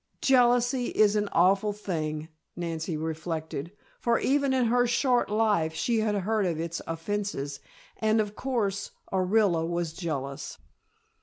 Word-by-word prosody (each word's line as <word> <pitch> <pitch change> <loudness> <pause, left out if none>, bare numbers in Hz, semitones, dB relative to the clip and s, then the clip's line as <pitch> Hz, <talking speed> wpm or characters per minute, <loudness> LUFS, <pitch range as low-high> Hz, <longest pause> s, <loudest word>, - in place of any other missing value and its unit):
Jealousy 245 -1 +4
is 215 -1 +3
an 205 -1 0
awful 195 +4 +3
thing, 155 -6 -3 0.3
Nancy 165 -1 -3
reflected, 160 0 -4 0.3
for 235 -1 +2
even 280 0 +2
in 260 -2 +2
her 245 +1 +3
short 245 0 +2
life 205 -7 +1
she 230 +6 +1
had 215 -1 +1
heard 205 0 0
of 165 -3 -2
its 165 0 -3
offences 165 -5 -3 0.4
and, 220 0 +2
of 210 -1 -1
course, 220 -7 -1 0.2
Orilla 185 -2 +2
was 170 -1 -2
jealous. 140 -5 -4
200 Hz, 135 wpm, -28 LUFS, 165-225 Hz, 0.4 s, Jealousy